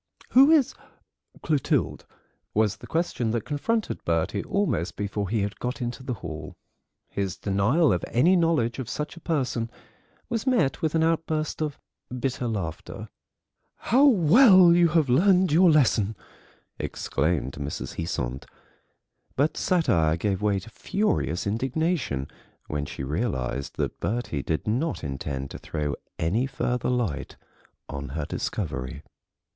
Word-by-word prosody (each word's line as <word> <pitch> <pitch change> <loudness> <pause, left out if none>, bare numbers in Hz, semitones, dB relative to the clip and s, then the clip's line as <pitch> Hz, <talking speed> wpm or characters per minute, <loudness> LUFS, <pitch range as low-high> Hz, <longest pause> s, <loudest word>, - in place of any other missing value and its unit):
"Who 270 +3 +7
is 295 -5 +4 0.7
Clotilde?" 150 -4 0 0.5
was 105 -1 +2
the - - -12
question 160 -8 -1
that 115 -1 -1
confronted 215 +10 -1
Bertie 85 +4 0
almost 200 - -1
before 100 -1 -3
he 110 0 +1
had 100 0 -3
got 125 +3 -3
into 120 +1 -4
the 130 -1 -3
hall. 80 -5 -7 0.5
His 100 -2 -3
denial 105 - +2
of 90 - -1
any 165 +11 +4
knowledge 160 -9 +1
of 130 -2 -4
such 150 +4 -4
a - - -11
person 130 -8 -1 0.6
was 230 +1 -3
met 210 - +2
with 160 0 0
an 160 - +3
outburst 160 -1 0
of 150 -2 -2 0.4
bitter 130 -1 -2
laughter. 95 -8 -5 0.7
"How 265 +5 +3
well 185 - +7
you 175 0 +5
have 160 -2 +2
learned 180 +7 +4
your 175 +4 +6
lesson!" 115 -8 +3 0.6
exclaimed 70 -3 -1
Mrs. 70 +1 -5
Heasant. 70 -6 -3 0.9
But 145 +4 +1
satire 85 - +2
gave 95 +2 -1
way 105 -2 +2
to 110 - -12
furious 195 - -1
indignation 130 - -1 0.4
when 75 -1 -3
she 65 - -6
realised 70 - -2
that - - -3
Bertie 110 - -2
did 80 +3 -2
not 130 - -1
intend 70 -1 -4
to - - -7
throw 75 -2 -3 0.2
any 105 +11 +1
further 125 -2 -1
light 120 - -2 0.5
on 70 -1 -6
her 75 - -2
discovery. 65 - -4
120 Hz, 135 wpm, -26 LUFS, -, 0.9 s, Who